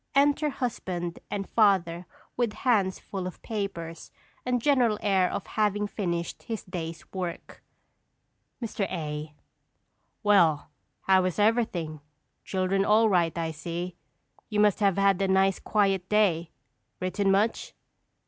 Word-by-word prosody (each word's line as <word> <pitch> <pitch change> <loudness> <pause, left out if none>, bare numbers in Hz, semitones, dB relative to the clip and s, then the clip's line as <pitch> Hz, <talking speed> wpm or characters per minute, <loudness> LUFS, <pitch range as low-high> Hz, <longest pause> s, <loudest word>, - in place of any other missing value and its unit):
Enter 290 +2 +3
husband 180 -10 -4
and 195 -1 -3
father 185 -5 +2 0.3
with 240 -3 0
hands 205 -8 +1
full 190 -2 -5
of 185 - -8
papers 195 -7 -5 0.4
and 250 -1 +2
general 245 -5 +3
air 190 -3 +3
of 190 - -4
having 210 +1 0
finished 175 -5 -3
his 225 -3 -5
day's 165 -3 -6
work._] 180 -3 -5 1.1
Mr. 210 -3 -2
A. 150 -3 -4 0.9
Well, 170 -9 +4 0.3
how 190 -1 +4
is 185 - -2
everything? 205 -9 +1 0.4
Children 190 +1 0
all 215 +2 +4
right, 175 -4 +2
I 165 -1 -1
see. 170 +3 -5 0.5
You 210 - -1
must 210 -2 +4
have 200 -3 +2
had 195 -1 +3
a 195 - +2
nice, 190 0 +3
quiet 195 -3 +1
day. 180 -6 +2 0.5
Written 195 +2 0
much? 205 +4 +1
195 Hz, 130 wpm, -27 LUFS, 175-210 Hz, 1.1 s, Well